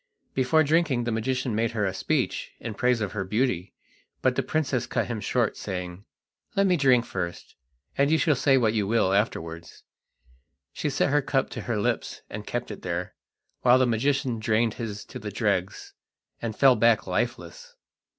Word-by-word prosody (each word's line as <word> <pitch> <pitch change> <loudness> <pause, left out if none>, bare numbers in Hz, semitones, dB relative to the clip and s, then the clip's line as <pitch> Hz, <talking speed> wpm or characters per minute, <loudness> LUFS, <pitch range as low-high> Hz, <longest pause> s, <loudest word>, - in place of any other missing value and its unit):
Before 135 +5 +3
drinking 150 -5 +2
the 120 - -2
magician 125 +2 -1
made 115 +1 0
her 105 -2 0
a 95 - -1
speech - - -1
in 115 - -5
praise 125 +2 +1
of 105 - -2
her 100 -3 -2
beauty, 100 -2 -1 0.5
but - - +3
the - - +1
princess 135 -6 -1
cut - - 0
him 115 -3 -4
short 120 -1 0
saying: 90 0 -6 0.5
"Let 195 - +3
me 185 -2 +4
drink 130 -6 +4
first, 85 -2 -5 0.4
and 140 +1 +4
you 160 - +4
shall 155 - +3
say 135 0 +3
what 110 -4 +2
you 105 -3 0
will 110 -3 +2
afterwards." 85 -5 -2 0.9
She 150 - -2
set 140 0 +1
her 145 0 +3
cup 135 0 0
to - - -5
her 120 -2 -2
lips 100 - -2
and 105 0 -7
kept 120 -1 -3
it 105 - -8
there, 90 0 -3 0.5
while 125 0 +6
the 130 - +4
magician 125 +1 0
drained 110 0 +1
his 105 -3 -6
to - - -9
the - - -5
dregs - - -2 0.5
and 115 -2 -3
fell 135 -2 +6
back 115 0 +3
lifeless. - - -3
115 Hz, 180 wpm, -26 LUFS, 105-135 Hz, 0.9 s, while